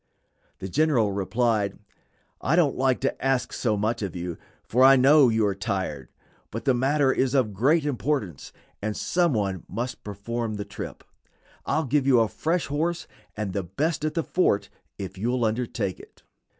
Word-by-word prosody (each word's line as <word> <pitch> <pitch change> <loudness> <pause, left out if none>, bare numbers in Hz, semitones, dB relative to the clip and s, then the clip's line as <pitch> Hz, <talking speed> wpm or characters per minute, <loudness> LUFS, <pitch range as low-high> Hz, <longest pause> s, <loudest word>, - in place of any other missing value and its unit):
The 95 - -6
general 130 - +2
replied: 100 +1 0 0.6
"I 150 - +2
don't 165 -5 +3
like 130 -1 +1
to 135 - -2
ask 135 -1 0
so 110 -4 0
much 110 +3 -1
of 100 -3 -4
you, 90 -1 -4 0.3
for 125 +3 +2
I 135 +1 +9
know 135 +1 +6
you 110 -1 +2
are 100 - +1
tired; 95 - -3 0.4
but 115 - -6
the 135 - +4
matter 135 +2 +2
is 130 +1 +1
of 115 -6 +2
great 145 - +2
importance 130 - -2 0.3
and 105 0 -3
some 175 -4 +1
one 100 -5 -1
must 120 +5 -4
perform 110 +2 -4
the 100 -1 -5
trip. - - -8 0.6
I'll 155 -1 +1
give 140 +1 +1
you 130 -3 +6
a 115 - +3
fresh 165 +7 -1
horse, 165 +4 -2 0.3
and 105 -3 -3
the 100 - -1
best 140 - -2
at 155 0 -1
the 165 - 0
fort, 175 - +1 0.3
if 95 -1 -7
you'll 120 +3 0
undertake 110 -4 -2
it." - - -16
120 Hz, 175 wpm, -25 LUFS, 100-140 Hz, 0.6 s, I